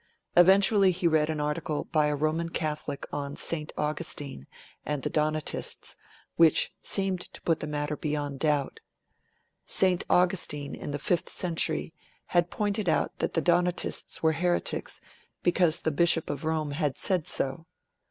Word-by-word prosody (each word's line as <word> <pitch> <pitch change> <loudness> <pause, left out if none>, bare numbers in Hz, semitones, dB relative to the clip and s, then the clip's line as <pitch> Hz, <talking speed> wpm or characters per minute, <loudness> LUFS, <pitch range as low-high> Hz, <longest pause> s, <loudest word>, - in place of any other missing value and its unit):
Eventually 195 +2 +6
he 180 -1 +1
read 155 -1 +3
an 155 -1 -2
article 150 0 -2
by 155 -2 +3
a 150 - 0
Roman 155 +3 0
Catholic 150 -3 -3
on 140 -1 -3
St. 155 -2 -2
Augustine 150 - -2 0.4
and 150 -3 -3
the - - -2
Donatists, 155 0 -2 0.4
which 165 -2 +4
seemed 195 -2 -1
to - - -9
put 165 -2 +1
the 155 - -4
matter 150 0 -2
beyond 145 -2 -3
doubt. 150 -3 0 0.9
St. 185 -2 +2
Augustine, 175 -5 +1
in - - -6
the 145 - -2
fifth 170 +4 -1
century, 165 -2 -1 0.3
had 175 -1 +2
pointed 205 -2 -1
out - - +1
that - - -1
the 165 - +2
Donatists 175 +2 0
were 160 0 +4
heretics 175 +3 -1 0.4
because 175 -2 +2
the 160 - 0
Bishop 165 +1 +3
of 145 +1 -5
Rome 155 -2 -1
had 145 -2 -1
said 180 -5 0
so. 140 +5 0
160 Hz, 150 wpm, -28 LUFS, 150-175 Hz, 0.9 s, Eventually